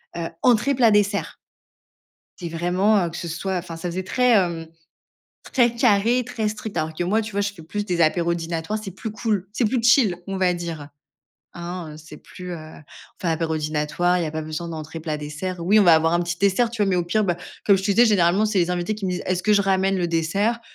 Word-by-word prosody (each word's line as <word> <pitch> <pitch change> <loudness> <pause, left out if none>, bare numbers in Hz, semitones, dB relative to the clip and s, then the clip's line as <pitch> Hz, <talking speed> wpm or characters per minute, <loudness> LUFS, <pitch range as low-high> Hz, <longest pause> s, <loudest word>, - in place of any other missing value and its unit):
heu, 170 -1 -3 0.2
entrée, 250 +3 +3
plat, 235 -4 +4
dessert. 205 0 +1 1.0
C'est 175 -3 -5
vraiment, 180 +4 +1
heu, - - -4
que 170 - -8
ce 170 - -5
soit, 185 +3 -3
enfin 170 -1 -7
ça 175 +2 -5
faisait 185 +2 -3
très, 250 +5 +2
hem, 170 -6 +2 0.9
très 240 -3 +3
carré, 235 +1 +3
très 225 -4 -2
strict. 215 0 -7
Alors 155 0 -2
que 175 - -3
moi, 215 +5 +1
tu 215 0 -6
vois? 200 +1 -1
Je 205 0 -2
fais 165 - -13
plus 205 +5 -4
des 175 -3 0
apéros 170 +2 +2
dînatoires. 165 +5 -3
C'est 195 - -6
plus 215 +4 -6
cool, 210 -4 -2
c'est 235 - +1
plus 235 +2 0
chill, 230 -7 +4
on 195 0 -3
va 180 -1 +2
dire. 165 -4 -6 0.6
Hein, 170 -3 -7
c'est 155 -1 -12
plus, 180 +3 -9
heu, - - -4
on 155 0 -11 0.4
fait 180 - -4
un - - +2
apéro 160 0 -1
dînatoire. 155 +3 0
Il - - -1
y - - -1
a - - -4
pas 155 0 -4
besoin 155 +2 -5
d'entrée, 160 0 -7
plat, 155 -1 -3
dessert. 150 +5 -5
Oui, 200 +6 +4
on - - +6
va 170 -2 +7
avoir 165 +1 +2
un 175 - +2
petit 170 0 -2
dessert, 200 +4 +2
tu 225 -3 -2
vois? 200 - +2
Mais 185 - +2
au 175 - 0
pire, 210 +5 +1
bah, 175 -3 0 0.3
comme 200 -2 +5
je 190 - -4
te 200 - 0
disais, 235 +4 +5
généralement, 195 0 +3
c'est 210 -3 0
les 175 0 +1
invités 180 +4 -1
qui 205 -2 -7
me - - -1
disent: 180 - -3
«Est-ce 185 -1 -1
que 215 - +3
je 205 - +4
ramène 195 0 +1
le 175 -1 0
dessert?» 195 +8 0
180 Hz, 250 wpm, -23 LUFS, 165-210 Hz, 1.0 s, va